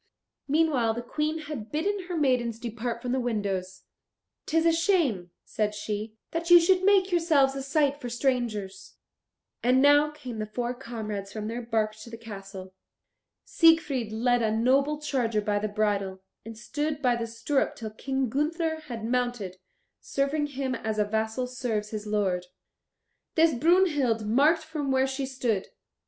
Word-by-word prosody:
Meanwhile 280 -7 +2
the 240 - -4
Queen 305 +5 -2
had 290 -8 -7
bidden 380 +5 -1
her 355 -2 -3
maidens 250 -6 +1
depart 235 +1 -4
from 250 - -2
the 260 - +1
windows. 200 -6 -3 0.6
"'Tis 325 +1 +2
a 335 - +6
shame," 325 - +1 0.2
said 210 -1 -1
she, 210 +1 -4 0.2
"that 335 +1 -3
you 350 0 +10
should 365 +2 +3
make 390 -1 +4
yourselves 315 -6 +3
a 275 - -4
sight 285 +1 +1
for 245 - -4
strangers." 230 -6 -2 0.7
And 250 +2 +4
now 290 +2 +5
came 260 -7 -8
the 215 - -3
four 240 +3 -3
comrades 215 -5 -6
from 215 0 -5
their 235 +2 -4
bark 220 -2 -1
to 230 - -11
the 230 - -8
castle. 195 -4 -9 0.7
Siegfried 300 -9 +3
led 240 +2 +2
a 220 - +2
noble 270 +7 +2
charger 245 -7 0
by 205 0 0
the 215 - -1
bridle, 200 -3 -1 0.2
and 225 0 -9
stood 295 +4 -3
by 245 -1 +3
the 235 -1 -3
stirrup 230 +5 -1
till 220 -2 -6
King 265 +4 -2
Gunther 320 +5 -1
had 230 -4 -5
mounted, 245 -6 -1 0.4
serving 285 +2 -1
him 270 -2 -3
as 220 -3 -3
a 210 - +2
vassal 220 +4 -1
serves 240 -4 -3
his 215 -1 -5
lord. 190 -4 0 0.9
This 325 -1 +5
Brunhild 290 - +2
marked 295 +9 +3
from 310 -3 -4
where 265 0 +3
she 270 0 -3
stood. 240 -7 -1
245 Hz, 160 wpm, -27 LUFS, 215-295 Hz, 0.9 s, you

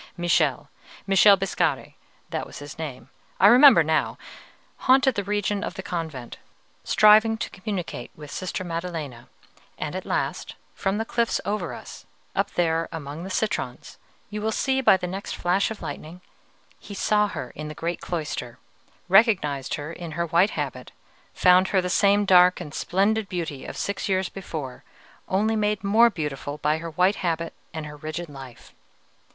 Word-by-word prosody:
Michele 175 0 +1 0.4
Michele 195 +1 +6
Biscari, 195 0 -1 0.4
that - - -3
was - - -11
his 145 +1 -10
name; 135 -4 -7 0.3
I 190 - +5
remember 245 - +8
now 155 0 0 0.7
haunted 265 0 +5
the 200 - -2
region 205 +1 -1
of - - -5
the 190 - -6
convent, 160 -10 -5 0.5
striving 215 +1 +5
to - - -4
communicate 185 - -5
with 150 -2 -11
Sister 185 +2 -4
Maddelena; 165 -8 -5 0.5
and - - -4
at - - -5
last, - - -2 0.2
from 195 +1 -1
the 225 - -2
cliffs 235 0 0
over 205 -5 -2
us, - - -11 0.3
up - - +1
there 165 -1 +1
among 155 0 -6
the 190 - -6
citrons 215 +3 -3 0.3
you 210 0 -4
will 220 +1 0
see 265 +4 0
by 195 - +6
the 180 - -5
next 190 +3 -5
flash 180 +3 +1
of 220 - -7
lightning 155 +5 -7 0.6
he 200 - -10
saw 210 +1 +2
her 125 -10 -6
in 150 +1 -7
the 150 - -7
great 170 +2 -3
cloister, 150 -8 -4 0.5
recognized 180 - +3
her 150 +2 -6
in 170 -3 -7
her 170 +2 -1
white 170 +4 +3
habit, - - -4 0.4
found 180 +1 +5
her 190 - +2
the 180 0 -2
same 205 +1 +3
dark 180 -1 +6
and 155 -5 -8
splendid 200 +4 0
beauty 165 -6 -4
of - - -7
six 200 0 -3
years 190 -1 +1
before, 155 -9 -7 0.4
only 215 +4 +1
made 210 -1 0
more 220 +4 +5
beautiful 150 -5 -5
by 150 +1 0
her 165 0 -6
white 180 +6 +2
habit 165 -2 -2 0.2
and 160 -2 -6
her 150 0 -9
rigid 155 +3 -6
life. 130 -4 -12
180 Hz, 165 wpm, -24 LUFS, 155-205 Hz, 0.7 s, remember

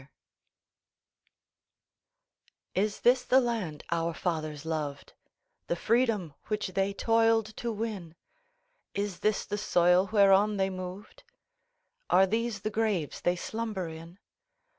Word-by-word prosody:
] - - -54 0.3
IS 205 +2 -1
this 250 +1 +4
the 260 - +5
land 225 - -2
our 170 -1 0
fathers 155 -4 -3
loved, 150 -3 -4 0.5
The - - 0
freedom 220 - +1
which 210 -2 -2
they 195 +2 0
toiled 225 +1 +2
to 235 - -2
win? 205 -7 -5 0.8
Is 200 -2 -2
this 215 -1 0
the 205 - -3
soil 180 0 +3
whereon 200 0 +5
they 190 0 +1
moved? 185 +2 -8 0.9
Are 190 - +6
these 225 +1 -2
the 215 - -2
graves 210 -8 -1
they 175 - +2
slumber 215 -1 -4
in? 165 +2 -10
200 Hz, 120 wpm, -29 LUFS, 175-225 Hz, 0.9 s, Are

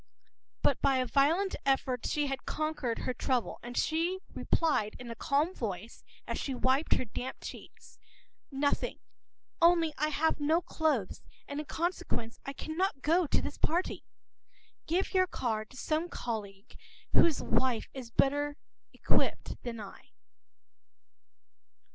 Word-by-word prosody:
” - - -60
But 280 - +3
by 270 -1 +4
a 255 - +2
violent 310 +10 +3
effort 265 -2 +1
she 295 -1 +1
had 270 -2 -4
conquered 310 -6 -1
her 255 - -2
trouble, 250 -1 -1
and 240 0 -7
she 335 +4 +1 0.2
replied 290 -10 +1
in 245 -1 -7
a - - -5
calm 295 +8 +1
voice 220 - -5 0.2
as - - -3
she 270 - -2
wiped 260 +4 +3
her - - -1
damp 245 +4 -5
cheeks:— - - -10 0.5
“Nothing. 285 0 0 0.6
Only 335 -2 +5
I 305 - +3
have 310 +1 +1
no 310 +3 +3
clothes, 305 - 0 0.3
and 285 +1 -4
in 300 - -5
consequence 320 -9 -2
I 275 - -5
cannot 315 -1 -2
go 335 +2 +3
to - - +2
this - - -5
party. 345 +4 0 0.8
Give 355 +4 0
your 370 -1 +4
card 220 -9 -2
to 260 - -14
some 315 +5 0
colleague 205 -7 -5 0.4
whose 325 -4 +5
wife 255 -4 +1
has 255 -3 -7
a - - -37
better 290 +1 +2 0.4
outfit - - +1
than 235 -2 -5
I. 200 -2 -11
280 Hz, 145 wpm, -31 LUFS, 245-320 Hz, 0.8 s, Only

